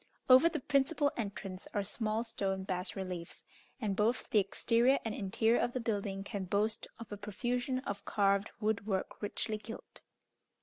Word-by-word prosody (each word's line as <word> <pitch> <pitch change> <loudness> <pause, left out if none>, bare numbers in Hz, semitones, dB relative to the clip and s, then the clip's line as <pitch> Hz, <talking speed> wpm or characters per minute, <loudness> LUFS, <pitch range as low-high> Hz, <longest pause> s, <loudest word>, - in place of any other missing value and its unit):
Over 260 +6 +8
the 315 -2 -2
principal 285 +2 +2
entrance 200 -4 -5
are 205 - +2
small 215 +2 -1
stone 195 -4 -2
bas 185 -1 -2
reliefs, 180 -3 -5 0.3
and 210 -5 -1
both 220 +5 +1
the 215 - +6
exterior 230 +6 +3
and 225 - -1
interior 220 +4 +2
of 240 0 0
the 255 - -1
building 200 -4 -2
can 200 -2 -4
boast 210 +4 0
of 230 -1 -10
a 205 - -4
profusion 245 +5 -1
of 200 -6 -4
carved 200 0 +2
wood 210 -1 0
work 190 -3 -2
richly 215 +1 -1
gilt. 225 +1 -10
210 Hz, 165 wpm, -33 LUFS, 195-240 Hz, 0.3 s, Over